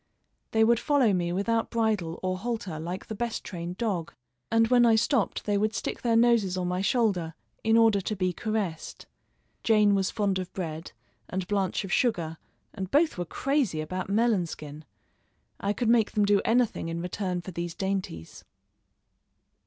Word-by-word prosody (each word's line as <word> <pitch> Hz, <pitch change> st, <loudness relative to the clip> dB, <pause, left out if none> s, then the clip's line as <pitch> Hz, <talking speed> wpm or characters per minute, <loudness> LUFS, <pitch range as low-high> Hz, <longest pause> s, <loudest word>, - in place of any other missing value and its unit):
They 220 Hz, 0 st, +3 dB
would 230 Hz, +1 st, +4 dB
follow 275 Hz, -8 st, +3 dB
me 175 Hz, -2 st, 0 dB
without 225 Hz, +5 st, 0 dB
bridle 215 Hz, -8 st, 0 dB
or 185 Hz, 0 st, -1 dB
halter 210 Hz, -7 st, -4 dB
like 175 Hz, +4 st, -5 dB
the -, -, -6 dB
best 235 Hz, +1 st, -3 dB
trained 175 Hz, 0 st, -6 dB
dog, 180 Hz, -8 st, -2 dB, 0.4 s
and 225 Hz, 0 st, +4 dB
when 245 Hz, -1 st, +5 dB
I 230 Hz, -2 st, +5 dB
stopped 230 Hz, 0 st, +1 dB
they 205 Hz, -1 st, +1 dB
would 215 Hz, +1 st, 0 dB
stick -, -, -3 dB
their 235 Hz, -2 st, +2 dB
noses 230 Hz, -5 st, +3 dB
on 180 Hz, -1 st, -1 dB
my 180 Hz, +1 st, -1 dB
shoulder 195 Hz, -8 st, +1 dB, 0.3 s
in 225 Hz, +1 st, +4 dB
order 225 Hz, -3 st, +4 dB
to 210 Hz, +3 st, -3 dB
be 185 Hz, -2 st, 0 dB
caressed. 205 Hz, -6 st, -3 dB, 0.6 s
Jane 210 Hz, -2 st, +4 dB
was 195 Hz, -1 st, +1 dB
fond 200 Hz, -4 st, 0 dB
of 185 Hz, -1 st, -5 dB
bread, 165 Hz, -3 st, -5 dB, 0.4 s
and 185 Hz, -1 st, -3 dB
Blanche 195 Hz, 0 st, 0 dB
of 195 Hz, -, -4 dB
sugar, 170 Hz, -10 st, 0 dB, 0.3 s
and 190 Hz, -3 st, -5 dB
both 305 Hz, -, +2 dB
were 175 Hz, -, -1 dB
crazy 265 Hz, -, 0 dB
about 185 Hz, +5 st, -4 dB
melon 210 Hz, -4 st, +2 dB
skin. 150 Hz, -1 st, -9 dB, 0.7 s
I 200 Hz, -, 0 dB
could 235 Hz, +3 st, -1 dB
make 230 Hz, -2 st, +3 dB
them 210 Hz, -2 st, +3 dB
do 200 Hz, -1 st, +3 dB
anything 235 Hz, -7 st, +1 dB
in 165 Hz, 0 st, -3 dB
return 180 Hz, +1 st, -3 dB
for 185 Hz, -, -8 dB
these 170 Hz, -1 st, -4 dB
dainties. 190 Hz, -, -4 dB
200 Hz, 175 wpm, -27 LUFS, 180-225 Hz, 0.7 s, when